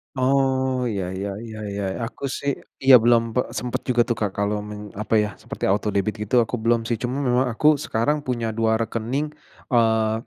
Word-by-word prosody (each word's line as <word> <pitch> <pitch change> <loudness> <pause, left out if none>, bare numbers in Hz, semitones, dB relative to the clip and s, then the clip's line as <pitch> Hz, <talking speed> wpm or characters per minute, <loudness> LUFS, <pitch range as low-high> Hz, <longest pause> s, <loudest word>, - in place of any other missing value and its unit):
Oh. 135 +1 +2 0.3
Iya, 95 -5 -3
ya 100 +1 -3 0.2
ya 110 - -8 0.2
ya, 100 - -2 0.2
aku 115 +4 -10
sih 140 - -1 0.3
iya, 135 -1 +9
belum 120 0 +5
pe 125 - +4 0.2
sempet 125 -1 -3
juga 120 -1 +4
tuh 120 - 0
Kak 105 -2 0
kalau 100 +1 0
men 105 0 -7
apa 105 +2 -3
ya, 105 - -2
seperti - - -5
autodebit 100 0 0
gitu, 105 +4 -1
aku 120 +1 0
belum 115 0 +3
sih. 120 - 0
Cuman 125 +3 -2
memang 125 +1 +3
aku 115 +6 +1 0.2
sekarang 120 +7 +1
punya 120 -3 -2
2 110 0 +2
rekening, 115 +5 -2 0.5
eee, 110 -2 +3
115 Hz, 185 wpm, -23 LUFS, 105-125 Hz, 0.5 s, iya